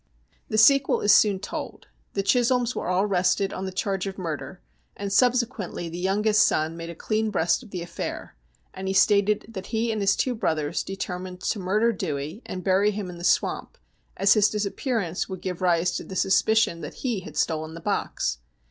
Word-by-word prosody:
The 215 - -1
sequel 275 +5 +5
is 205 - +5
soon 205 -3 +5
told. 200 - -6 0.3
The 195 - -1
Chisholms 245 +2 +2
were - - -3
all 180 +2 +2
arrested 190 0 +1
on 190 - -4
the 190 - -4
charge 195 0 -2
of 195 - -6
murder, 175 +1 -5 0.4
and 200 -1 -3
subsequently 235 -7 +1
the 170 +2 -6
youngest 210 +3 +2
son 160 -3 +2
made 165 0 -7
a 170 - -7
clean 215 +5 -1
breast 175 -1 +1
of 240 - -14
the 180 -3 -5
affair, 170 0 -6 0.4
and 190 0 -6
he 190 - -1
stated 205 +1 +3
that 190 -4 -7
he 225 0 0
and 215 -1 -2
his 195 0 +3
two 255 - 0
brothers 160 -7 -1
determined 185 -1 -6
to 215 - -1
murder 210 +5 +2
Dewey, 155 - -4
and 185 -1 -5
bury 195 +2 +3
him 200 -3 -4
in 175 - -10
the - - -9
swamp, - - 0 0.4
as 195 +1 +5
his 210 -1 +4
disappearance 210 -3 -2
would 190 -1 -5
give 180 -1 -4
rise 175 -1 +2
to - - -6
the 190 - -9
sus 190 +1 +3
picion 220 -6 +2
that - - -7
he 235 -6 0
had 155 -5 -10
stolen 160 0 -1
the - - -7
box. 65 - -2
195 Hz, 200 wpm, -25 LUFS, 175-215 Hz, 0.4 s, sequel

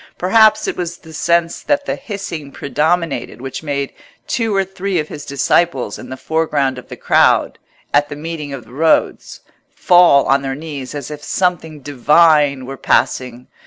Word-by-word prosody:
Perhaps 215 +4 +4
it - - -2
was 175 -1 -4
the 160 -1 -15
sense 170 +1 0
that 285 -1 0
the - - -2
hissing 170 -9 -7
predominated 155 -3 -1
which 130 +1 -6
made 140 -3 -3 0.3
two 225 -3 -1
or 195 0 +2
three 195 0 -3
of 155 -1 -2
his 145 - -8
disciples 140 -3 0
in 125 - -10
the 130 - -6
foreground 145 -5 -1
of - - -14
the - - -8
crowd, - - +2 0.3
at 145 0 +3
the 145 - -6
meeting 155 -1 -6
of 135 -4 -7
the 115 - -17
roads, 160 +3 0 0.3
fall 175 -6 +5
on 135 +1 +2
their 135 -1 -3
knees 145 -3 -7
as 145 +1 -6
if 150 -1 -8
something 160 -5 -1
divine 145 0 +3
were 135 +1 -7
passing. 125 0 0
150 Hz, 170 wpm, -17 LUFS, 135-170 Hz, 0.3 s, fall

